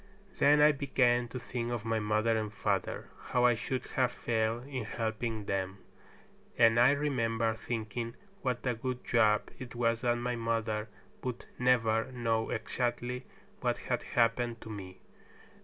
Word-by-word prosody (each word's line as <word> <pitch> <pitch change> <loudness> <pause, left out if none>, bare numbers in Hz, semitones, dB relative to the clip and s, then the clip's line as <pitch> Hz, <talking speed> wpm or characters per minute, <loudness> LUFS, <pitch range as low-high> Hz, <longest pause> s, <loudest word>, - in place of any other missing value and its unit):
Then 150 +1 +6
I 150 +1 +8
began 125 -4 +2
to 125 - -6
think 120 0 -3
of 115 -3 -3
my 115 0 +1
mother 110 +2 +2
and 110 -1 -1
father, 105 - -1 0.2
how 125 0 +2
I 120 - +6
should 125 +3 -3
have 130 -2 +3
failed 115 0 -1
in 135 -4 -4
helping 110 -1 -3
them; 95 0 -2 0.8
and 115 0 +6
I 120 +2 +7
remember 115 -6 +1
thinking 115 +1 -4 0.3
what 125 -2 -2
a 125 - +2
good 125 +2 -4
job 110 -3 +3
it 125 -1 -8
was 115 -1 +1
that 120 -1 +2
my 120 +1 -1
mother 115 -2 -1 0.3
would 125 -2 -4
never 120 -1 +3
know 115 -3 0
exactly 120 +2 -2 0.3
what - - 0
had - - -2
happened 115 0 +1
to 110 - -8
me. 95 -3 -8
115 Hz, 155 wpm, -31 LUFS, 110-125 Hz, 0.8 s, I